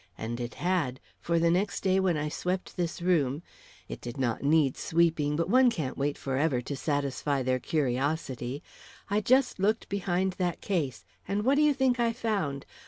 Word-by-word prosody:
And 120 Hz, +2 st, -4 dB
it 120 Hz, 0 st, -5 dB
had; 170 Hz, -8 st, 0 dB, 0.2 s
for 170 Hz, 0 st, 0 dB
next 175 Hz, +5 st, +1 dB
day 190 Hz, 0 st, +3 dB
when 185 Hz, -4 st, +2 dB
I 150 Hz, 0 st, -1 dB
swept 180 Hz, +4 st, -3 dB
this 170 Hz, -1 st, -3 dB
room 155 Hz, -4 st, +1 dB, 0.4 s
it -, -, -7 dB
did 120 Hz, +3 st, -7 dB
not 120 Hz, -4 st, -1 dB
need 145 Hz, -1 st, +3 dB
sweeping, 160 Hz, -3 st, +1 dB
but 165 Hz, +2 st, 0 dB
one 255 Hz, +5 st, +5 dB
can't 155 Hz, -, -3 dB
wait 145 Hz, +1 st, -1 dB
for 135 Hz, -1 st, -3 dB
ever 140 Hz, -3 st, +2 dB
to 130 Hz, +4 st, -5 dB
satisfy 140 Hz, -1 st, -1 dB
their 130 Hz, 0 st, +1 dB
curiosity 135 Hz, -1 st, -1 dB, 0.5 s
I 210 Hz, +1 st, +2 dB
just 255 Hz, +1 st, +3 dB
looked 215 Hz, +4 st, +1 dB
behind 190 Hz, -1 st, 0 dB
that 175 Hz, -2 st, -1 dB
case, 155 Hz, -, -2 dB, 0.2 s
and 205 Hz, +1 st, -1 dB
what 265 Hz, -, +4 dB
do 290 Hz, -, +3 dB
you 300 Hz, -2 st, +4 dB
think 260 Hz, -2 st, +2 dB
I 230 Hz, -1 st, +2 dB
found? 195 Hz, -, -2 dB
165 Hz, 180 wpm, -29 LUFS, 140-190 Hz, 0.5 s, one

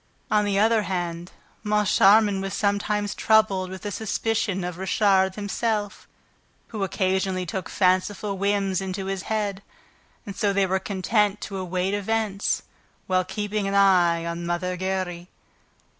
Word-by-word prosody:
On 210 Hz, -1 st, +3 dB
the 200 Hz, -1 st, 0 dB
other 220 Hz, +2 st, +4 dB
hand, 175 Hz, -3 st, -4 dB, 0.3 s
Moncharmin 210 Hz, -1 st, +4 dB
was 195 Hz, 0 st, -4 dB
sometimes 205 Hz, 0 st, 0 dB
troubled 210 Hz, -4 st, +2 dB
with 190 Hz, +2 st, -9 dB
a 205 Hz, -, -2 dB
suspicion 215 Hz, -2 st, -1 dB
of 180 Hz, 0 st, -5 dB
Richard 190 Hz, -1 st, +2 dB
himself, 210 Hz, 0 st, -2 dB, 0.6 s
who 215 Hz, -3 st, -3 dB
occasionally 190 Hz, -1 st, 0 dB
took 185 Hz, +2 st, -5 dB
fanciful 195 Hz, +2 st, +1 dB
whims 195 Hz, -1 st, 0 dB
into 190 Hz, 0 st, -4 dB
his 195 Hz, -1 st, -3 dB
head. 205 Hz, -3 st, -1 dB, 0.6 s
And 200 Hz, -, -7 dB
so 200 Hz, -1 st, +1 dB
they 195 Hz, 0 st, +2 dB
were 190 Hz, 0 st, 0 dB
content 205 Hz, +2 st, 0 dB
to 195 Hz, -, -5 dB
await 185 Hz, +1 st, -2 dB
events, 205 Hz, 0 st, -1 dB, 0.4 s
while 185 Hz, -1 st, +1 dB
keeping 205 Hz, +1 st, -3 dB
an 195 Hz, -, -1 dB
eye 175 Hz, -4 st, +4 dB
on 170 Hz, 0 st, -4 dB
Mother 175 Hz, +1 st, -2 dB
Giry. 185 Hz, -1 st, -3 dB
195 Hz, 140 wpm, -24 LUFS, 185-205 Hz, 0.6 s, other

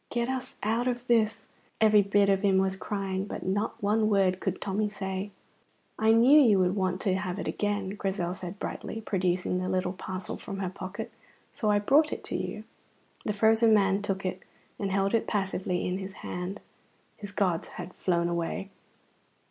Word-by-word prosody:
"Get 240 Hz, +1 st, -1 dB
us 260 Hz, -1 st, -4 dB
out 225 Hz, +4 st, +1 dB
of 245 Hz, 0 st, -2 dB
this," 225 Hz, -3 st, +2 dB, 0.3 s
every 215 Hz, -1 st, +6 dB
bit 200 Hz, 0 st, +3 dB
of 195 Hz, -1 st, +3 dB
him 195 Hz, -2 st, +3 dB
was 190 Hz, 0 st, +2 dB
crying, 195 Hz, -1 st, -3 dB
but -, -, -6 dB
not 205 Hz, +3 st, -1 dB
one 215 Hz, +1 st, +2 dB
word 190 Hz, -3 st, +3 dB
could -, -, -2 dB
Tommy 205 Hz, +2 st, -1 dB
say. 190 Hz, -1 st, -4 dB, 0.7 s
"I 220 Hz, 0 st, +4 dB
knew 250 Hz, +7 st, +7 dB
you 220 Hz, -7 st, +5 dB
would 185 Hz, 0 st, +2 dB
want 185 Hz, -2 st, 0 dB
to 190 Hz, -, +1 dB
have 185 Hz, -1 st, -2 dB
it -, -, -4 dB
again," 205 Hz, -2 st, -1 dB
Grizel 190 Hz, -3 st, -2 dB
said 185 Hz, +1 st, -7 dB
brightly, 225 Hz, -, -5 dB
producing 180 Hz, -3 st, 0 dB
the 185 Hz, -, -2 dB
little 185 Hz, 0 st, 0 dB
parcel 185 Hz, 0 st, -5 dB
from 195 Hz, -, -6 dB
her 190 Hz, -2 st, -3 dB
pocket, 190 Hz, +1 st, -6 dB, 0.4 s
"so 215 Hz, -, -1 dB
I 205 Hz, -, +4 dB
brought 285 Hz, +9 st, +4 dB
it -, -, -5 dB
to -, -, -3 dB
you." -, -, -4 dB, 0.6 s
The 210 Hz, -, 0 dB
frozen 220 Hz, +1 st, +5 dB
man 195 Hz, -1 st, +3 dB
took 195 Hz, -2 st, -2 dB
it 185 Hz, -, -3 dB, 0.4 s
and 200 Hz, -2 st, -1 dB
held 195 Hz, +1 st, +1 dB
it 230 Hz, -, +1 dB
passively 190 Hz, -3 st, -1 dB
in 180 Hz, +1 st, -1 dB
his 190 Hz, 0 st, -6 dB
hand. 180 Hz, +3 st, -4 dB, 0.6 s
His 205 Hz, -1 st, -8 dB
gods 185 Hz, -4 st, 0 dB
had 180 Hz, 0 st, -8 dB
flown 170 Hz, -2 st, 0 dB
away. 170 Hz, +3 st, -3 dB
195 Hz, 185 wpm, -28 LUFS, 185-215 Hz, 0.7 s, knew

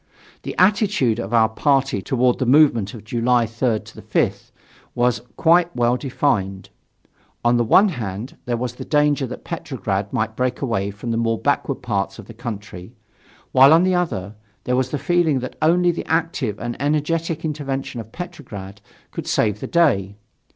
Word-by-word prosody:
The -, -, -6 dB
attitude 190 Hz, -, +3 dB
of 100 Hz, -2 st, -5 dB
our 115 Hz, -2 st, +5 dB
party 135 Hz, -1 st, +1 dB
toward 125 Hz, +2 st, +1 dB
the 130 Hz, -, 0 dB
movement 125 Hz, -7 st, +4 dB
of 110 Hz, -, -10 dB
July 120 Hz, +2 st, +1 dB
3rd 115 Hz, 0 st, -1 dB, 0.2 s
5th -, -, -1 dB, 0.5 s
was 120 Hz, 0 st, +1 dB, 0.2 s
quite 170 Hz, +1 st, +3 dB
well 120 Hz, 0 st, +2 dB
defined. 105 Hz, -7 st, -1 dB, 0.8 s
On 120 Hz, 0 st, +4 dB
the 120 Hz, -, +2 dB
one 195 Hz, -, +5 dB
hand, 110 Hz, -, -5 dB
there 120 Hz, -1 st, -1 dB
was 120 Hz, 0 st, -3 dB
the -, -, -8 dB
danger 145 Hz, -2 st, +2 dB
that 125 Hz, -, -8 dB
Petrograd 105 Hz, -, -3 dB
might 110 Hz, -3 st, -1 dB
break 125 Hz, +1 st, -1 dB
away 115 Hz, -7 st, -1 dB
from 105 Hz, +4 st, -6 dB
the 115 Hz, -, 0 dB
more 115 Hz, -1 st, +1 dB
backward -, -, -1 dB
parts 95 Hz, -1 st, -2 dB
of -, -, -10 dB
the 115 Hz, -, -11 dB
country; 105 Hz, -3 st, -8 dB, 0.6 s
while 135 Hz, +2 st, +7 dB
on 165 Hz, +2 st, +6 dB
the 185 Hz, 0 st, +2 dB
other, 105 Hz, -, -2 dB, 0.3 s
there 125 Hz, -, 0 dB
was 130 Hz, 0 st, 0 dB
the 145 Hz, -, -2 dB
feeling 175 Hz, -3 st, +2 dB
that 130 Hz, -, -6 dB
only 175 Hz, +3 st, +4 dB
the 170 Hz, -, -6 dB
active 160 Hz, -, -1 dB
and 120 Hz, +2 st, -5 dB
energetic 160 Hz, +2 st, -1 dB
intervention 135 Hz, -5 st, -3 dB
of 110 Hz, 0 st, -14 dB
Petrograd 120 Hz, -, -8 dB, 0.3 s
could -, -, -6 dB
save 105 Hz, -2 st, +1 dB
the -, -, -5 dB
day. 105 Hz, -, +2 dB
125 Hz, 170 wpm, -21 LUFS, 110-150 Hz, 0.8 s, while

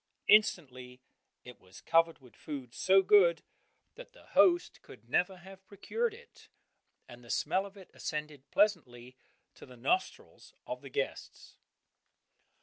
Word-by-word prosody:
Instantly 130 Hz, -12 st, +2 dB, 0.4 s
it 125 Hz, -2 st, -13 dB
was 95 Hz, +3 st, -16 dB
covered 165 Hz, 0 st, +2 dB
with 125 Hz, -3 st, -20 dB
food, 135 Hz, -5 st, -8 dB
so 190 Hz, +1 st, +3 dB
good 185 Hz, -4 st, +4 dB, 0.5 s
that -, -, -13 dB
the -, -, -19 dB
host 350 Hz, -1 st, +3 dB
could -, -, -16 dB
never 185 Hz, +1 st, 0 dB
have 190 Hz, +2 st, -14 dB
procured 450 Hz, -, -3 dB
it, 475 Hz, +2 st, -17 dB, 0.6 s
and 120 Hz, -1 st, -14 dB
the 120 Hz, -, -16 dB
smell 190 Hz, +10 st, 0 dB
of 200 Hz, +1 st, -17 dB
it 190 Hz, -, -15 dB
ascended 150 Hz, -3 st, -6 dB
pleasantly 130 Hz, -, 0 dB, 0.4 s
to -, -, -16 dB
the 125 Hz, -2 st, -14 dB
nostrils 365 Hz, -, -3 dB
of -, -, -6 dB
the -, -, -11 dB
guests. 475 Hz, +3 st, -6 dB
170 Hz, 140 wpm, -31 LUFS, 125-200 Hz, 0.6 s, good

